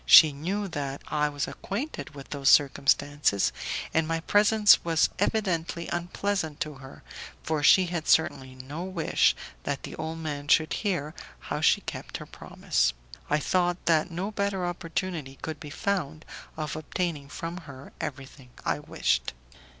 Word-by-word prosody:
She 155 -3 +10
knew 190 +8 -2
that 140 -3 -4
I 150 0 +1
was 145 -1 -3
acquainted 215 - -5
with 140 -1 -11
those 140 -1 +2
circumstances, 140 -5 +3 0.4
and 160 -1 +2
my 165 0 -1
presence 210 +3 +5
was 165 -1 +3
evidently 170 -6 0
unpleasant 175 -2 -2
to 155 - -2
her, 135 - -12 0.4
for 155 -1 -1
she 185 +5 +6
had 170 -3 -3
certainly 135 -5 +2
no 140 +6 -6
wish 185 -3 +2 0.3
that 140 -1 -3
the - - -7
old 160 +1 -4
man 145 -3 -5
should 155 +1 +4
hear 170 -8 -1 0.4
how - - -2
she - - +4
kept - - -6
her - - -9
promise. - - -1 0.4
I 150 - +3
thought 175 +3 0
that 160 0 +3
no 180 +5 -3
better 200 -3 -1
opportunity 165 -5 -4
could 155 -2 -4
be 150 - -8
found 155 -4 -2 0.3
of 155 -1 -3
obtaining 155 -2 -3
from 165 +4 -5
her 130 0 -11
everything 135 -1 -7 0.2
I - - 0
wished. 60 -1 0
160 Hz, 150 wpm, -27 LUFS, 145-175 Hz, 0.4 s, She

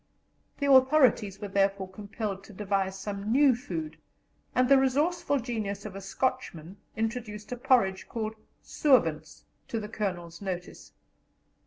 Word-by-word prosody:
The 285 - -1
authorities 260 -7 +4
were 205 - -5
therefore 195 -1 +1
compelled 200 0 -5
to 210 - -13
devise 195 -1 -1
some 200 +1 -4
new 270 0 +5
food, 165 - -5 0.6
and 255 0 +4
the 275 0 +6
resourceful 285 +3 +1
genius 215 -5 -4
of 200 -3 -7
a 195 - -6
Scotchman 195 -5 -3 0.2
introduced 220 -2 -4
a - - -1
porridge 240 -7 +2
called 220 -2 -3 0.3
"sowens" 165 - +1 0.2
to 230 - -2
the 210 -1 -6
Colonel's 175 -6 -4
notice. 185 -2 -6
210 Hz, 135 wpm, -28 LUFS, 195-250 Hz, 0.6 s, the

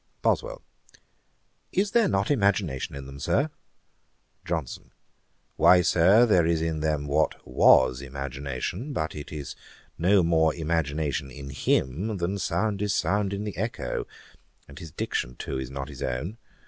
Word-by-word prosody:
BOSWELL. - - 0 1.1
'Is 200 +1 +1
there 230 -3 +4
not 100 +6 0
imagination 100 - 0
in 70 -1 -7
them, 70 +1 -10
Sir?' 95 - +1 0.9
JOHNSON. 80 -8 -4 0.7
'Why, 90 -1 +6
Sir, 95 +9 +5
there 90 -7 +3
is 85 -1 +2
in 80 -1 -1
them 75 -2 -1
what 75 +2 +1
was 65 +1 +5
imagination, 70 - -5
but 80 -8 -2
it 75 -1 -8
is 75 -3 -6 0.4
no 95 +2 +4
more 80 -1 +3
imagination 75 -4 -1
in 70 +1 -9
him, 80 - 0
than 95 +3 -2
sound 100 +2 -1
is 105 -1 0
sound 100 0 +1
in 100 +1 -3
the 105 -2 -5
echo. 110 +5 -3 0.6
And 70 +3 -12
his 85 -3 -8
diction 60 -3 -3
too 65 +1 -4
is 65 -2 -5
not 70 0 -5
his 70 -4 -10
own. 75 - -3
80 Hz, 150 wpm, -26 LUFS, 70-100 Hz, 1.1 s, Why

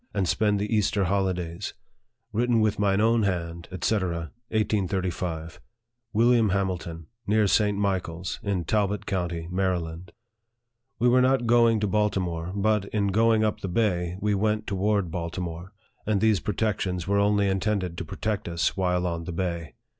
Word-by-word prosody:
87 - - -4
and 95 -2 +1
spend 105 +2 +2
the 105 +2 -1
Easter 105 -1 +2
holidays. 90 -1 -1 0.6
Written 120 +1 +2
with 110 -2 +1
mine 100 -1 +2
own 115 +1 +3
hand, 85 -4 -2 0.2
&c., - - +2
1835. 95 -3 -2 0.3
" 120 -1 -53
WILLIAM 115 0 +4
HAMILTON, 90 -4 -2
" 115 - -39
Near 105 +1 +3
St. 105 0 +2
Michael's, 95 -3 -2
in 100 -4 -1
Talbot 105 +2 0
county, 85 -3 -2
Maryland." 90 -2 -2 0.9
We 120 - +2
were 125 +1 +5
not 130 -1 +3
going 115 -1 +4
to 105 - +1
Baltimore; 90 -5 0
but, 105 0 +1
in 100 -1 0
going 110 +2 +3
up 110 - 0
the - - -4
bay, 90 -3 0
we 105 +1 +1
went 105 +1 0
toward 100 -2 0
Baltimore, 85 +1 -5 0.4
and 105 -2 +2
these 110 -2 +3
protections 95 -3 -1
were 100 +1 +2
only 100 0 +3
intended 95 -2 0
to - - -3
protect 105 +5 -3
us 85 -1 0
while 90 -2 0
on 85 -1 -3
the 90 - -4
bay. 85 -3 -3
100 Hz, 160 wpm, -26 LUFS, 90-105 Hz, 0.9 s, were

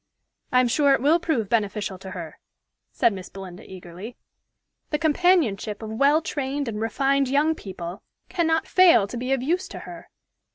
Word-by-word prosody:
"I 250 - +5
am 250 - +2
sure 280 +3 +3
it - - -3
will 315 +4 +4
prove 300 - -1
beneficial 205 -3 -1
to 190 - -9
her," 170 -4 -8 0.5
said 230 - +2
Miss 185 -2 -8
Belinda 190 -2 -10
eagerly. 185 +5 -10 0.7
"The 300 - 0
companionship 300 - +1
of 220 - -6
well 280 +7 +3
trained 280 -2 -3
and 215 -2 -4
refined 275 +5 +1
young 295 +4 +2
people 185 - -8 0.3
cannot 325 -2 0
fail 355 - +6
to 205 - -8
be 250 +2 -3
of 265 -2 +1
use 350 +7 0
to - - -8
her. - - -11
250 Hz, 170 wpm, -24 LUFS, 200-300 Hz, 0.7 s, fail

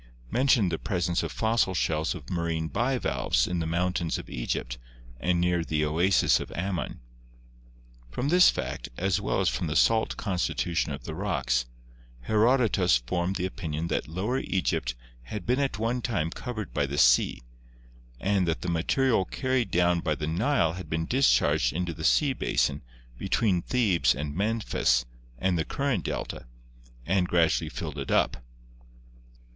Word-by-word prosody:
mentioned 125 -8 +3
the 80 - -2
presence 90 -4 -1
of - - -4
fossil 110 -4 +1
shells 80 -2 0
of - - -10
marine 85 -2 -2
bivalves 120 - 0
in 90 -1 -2
the 80 - -2
mountains 85 0 -1
of - - -9
Egypt - - -3 0.4
and. 90 +1 +1
near 90 -1 +1
the 75 -1 0
oasis 85 +5 +3
of - - -7
Ammon. 95 0 -3 1.1
From 125 - -2
this 180 +2 +7
fact, - - -4
as 95 +2 0
well 100 - 0
as 95 - +1
from 90 - -1
the 75 - -3
salt 110 +9 +3
constitution 85 -4 -1
of 70 - -6
the 80 - -6
rocks, 80 -10 -1 0.5
Herodotus 110 - +3
formed 85 +10 -2
the 90 - -1
opinion 85 -4 -4
that - - -1
Lower 100 - -2
Egypt 60 -9 -1 0.3
had 105 +7 -6
been 125 +3 +1
at 140 -6 -1
one 115 +3 -1
time 90 -10 -1
covered 110 -2 -6
by 70 -1 0
the 70 +1 -4
sea, - - +4 0.8
and 95 +1 +1
that 80 - -1
the 90 - -2
material 110 +7 +2
carried 130 -2 -1
down 90 0 +2
by 80 -2 -1
the 75 - -4
Nile 85 - +1
had 90 -3 -8
been 80 0 -1
discharged 125 - +3
into 85 +1 -2
the 80 - -8
sea 140 - +3
basin 75 - 0 0.4
between 95 -6 +1
Thebes 90 - +2
and 75 +1 -4
Memphis 100 - +1 0.3
and 90 -2 0
the - - +1
present 140 - -2
delta, - - -4 0.6
and 90 +1 +1
gradually 80 -2 +2
filled 75 -3 -6
it 70 - -5
up. - - +2
90 Hz, 160 wpm, -27 LUFS, 80-110 Hz, 1.1 s, this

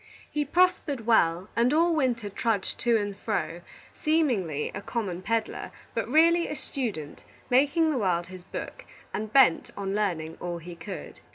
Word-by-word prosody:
He 295 -1 0
prospered 320 -6 +2
well, 180 -5 +3
and 235 +2 +3
all 330 +2 +3
winter 245 -7 0
trudged 205 0 -1
to 235 -1 +3
and 205 -2 -2
fro, 200 -5 -2 0.3
seemingly 240 - 0
a 200 - -5
common 200 -6 -3
peddler, 225 +3 -2 0.2
but 230 - -1
really 335 +4 +5
a - - -4
student, 225 - -5 0.3
making 290 +5 +4
the 270 - 0
world 175 -4 +1
his 185 0 -11
book, - - -7 0.3
and 215 0 -3
bent 255 -10 +5
on 195 -1 -2
learning 170 -6 -1
all 175 -1 -3
he 170 +1 -9
could. 185 +3 -8
220 Hz, 160 wpm, -27 LUFS, 185-280 Hz, 0.3 s, really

